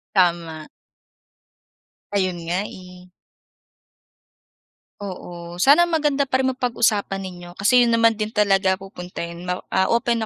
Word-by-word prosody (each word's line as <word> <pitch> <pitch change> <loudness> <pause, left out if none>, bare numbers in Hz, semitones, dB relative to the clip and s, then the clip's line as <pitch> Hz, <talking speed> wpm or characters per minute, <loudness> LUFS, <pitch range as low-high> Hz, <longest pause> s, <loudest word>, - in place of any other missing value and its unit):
Tama. 170 -4 +1 1.5
Ayun, 185 -3 +1
nga, 180 +4 0
eh. 180 -1 -13 1.9
Oo. 175 -3 -7
Sana 290 - +6
maganda 295 -4 +1
pa 260 -1 0
rin 260 - +1
mapag-usapan 220 -6 0
ninyo. 175 -2 -9
Kasi 240 +6 +4
'yon 235 - +1
naman 230 -1 +4
din 215 0 -3
talaga 195 -2 +3
pupunta 180 -2 -8
'yon, 170 +1 -7
ma 180 0 -3
ah, 190 - +2
open 235 -1 +1
195 Hz, 125 wpm, -22 LUFS, 180-235 Hz, 1.9 s, Sana